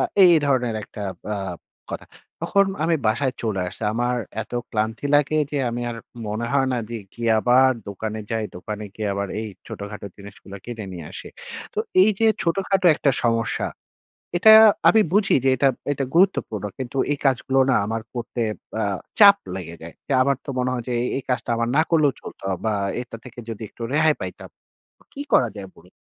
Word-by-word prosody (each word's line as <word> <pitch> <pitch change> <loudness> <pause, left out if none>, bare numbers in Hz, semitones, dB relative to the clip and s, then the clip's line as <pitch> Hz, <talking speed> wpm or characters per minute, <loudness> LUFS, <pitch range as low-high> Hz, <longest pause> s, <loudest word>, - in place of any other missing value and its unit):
আ - - +3 0.2
এই 175 -2 +8
ধরনের 125 -4 +1
একটা 105 - -9 0.2
ব্যা 105 -1 -2 0.5
কথা। - - -6 0.4
তখন 200 0 +3 0.2
আমি 165 - +2
বাসায় 125 +3 0
চলে 105 -5 -1
আসছি। 110 - -10
আমার 120 +1 0 0.3
এত 110 - -18 0.2
ক্লান্তি 110 +5 -2
লাগে 150 +2 +2
যে, 145 - 0
আমি 120 +1 -3
আর 115 - -6 0.3
মনে 110 +3 -2
হয় 135 -2 +2
না 125 - 0
দে 115 -1 -4 0.2
গিয়ে 115 -1 -1
আবার 130 +2 +5 0.2
দোকানে 110 +2 -4
যাই। 110 -1 -1
দোকানে 105 +3 -6
গিয়ে 105 -2 -3
আবার 100 0 -2
এই 110 - -4 0.2
ছোটখাটো 105 0 -7
জিনিসগুলো 100 0 -11
কিনে 115 -3 -6
নিয়ে 85 -4 -8
আসি। - - -8 0.5
তো - - -4 0.2
এইযে 215 +2 +3 0.2
ছোটখাটো 190 +1 +1
একটা 140 - +2
সমস্যা। 115 0 0 0.7
এটা 220 +4 +8 0.4
আমি 220 - +6
বুঝি 205 0 +3
যে, 135 - +4
এটা, 135 +2 +4 0.2
এটা 135 -1 -2
গুরুত্বপূর্ণ 170 - +2
কিন্তু 130 0 -6 0.2
এই 145 - -3
কাজগুলো 135 0 +2
না - - +4
আমার 110 0 -3
করতে 120 0 -3 0.4
আ - - +1 0.4
চাপ 200 -1 +10 0.2
লেগে 85 -2 -7
যায়। 85 - -9
তে 140 - -2
আমার 140 0 +2
তো - - -25
মনে 125 0 0
হয় 125 -2 -2
যে, - - -1
এই, - - -1
এই - - -6
কাজটা 125 - -1
আমার 115 0 0
না 155 - +6
করলেও 155 -4 +4
চলতো - - -11 0.2
বা 110 - +1 0.3
এটা 115 -2 -9
থেকে 125 -1 -13
যদি 115 0 -6
একটু 115 - -12
রেহাই 155 0 +4
পাইতাম। - - -7 0.6
কি 280 - -7
করা 120 - +5
যায় 95 -2 -7
বলুন? 90 - -18
120 Hz, 185 wpm, -23 LUFS, 110-140 Hz, 0.7 s, চাপ